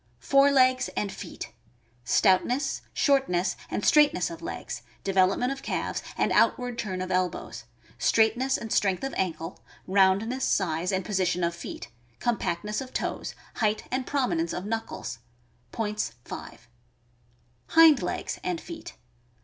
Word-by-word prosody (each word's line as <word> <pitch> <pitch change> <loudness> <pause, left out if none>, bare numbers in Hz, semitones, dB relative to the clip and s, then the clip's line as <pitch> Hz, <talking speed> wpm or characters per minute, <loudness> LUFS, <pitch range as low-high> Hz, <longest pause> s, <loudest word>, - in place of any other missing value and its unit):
Fore 275 - +4
legs 255 -2 +4
and 205 -2 -1
feet. - - -8 0.3
— 120 +1 -37
Stoutness, 245 +8 +2
shortness, 265 - +2
and - - -2
straight 300 -1 +6
ness 180 - -1
of 165 0 -8
legs, 125 -6 -5 0.2
development 195 +6 +2
of 275 0 -5
calves, - - -2 0.2
and - - +1
outward 245 -1 +2
turn 185 -5 -2
of 185 - -5
elbows; 185 -1 -2 0.3
straightness 240 +4 +3
and 225 - -4
strength 195 0 +1
of 270 - -3
ankle; 165 -2 -3 0.3
roundness, 200 +7 +2
size, 175 -2 +1
and 190 -1 -1
position 185 -3 0
of 170 0 +1
feet; 170 - -8 0.3
compactness 210 -2 -1
of 260 -1 -8
toes; - - -3 0.2
height 215 -1 +1
and 255 0 -1
prominence 290 +5 0
of 180 - -4
knuckles. 225 - -4 0.5
Points, 210 -1 -2
5. - - -9 1.0
Hind 325 -3 +7
legs - - -3
and 360 -2 -1
feet. 330 -1 -9
210 Hz, 140 wpm, -27 LUFS, 185-260 Hz, 1.0 s, Hind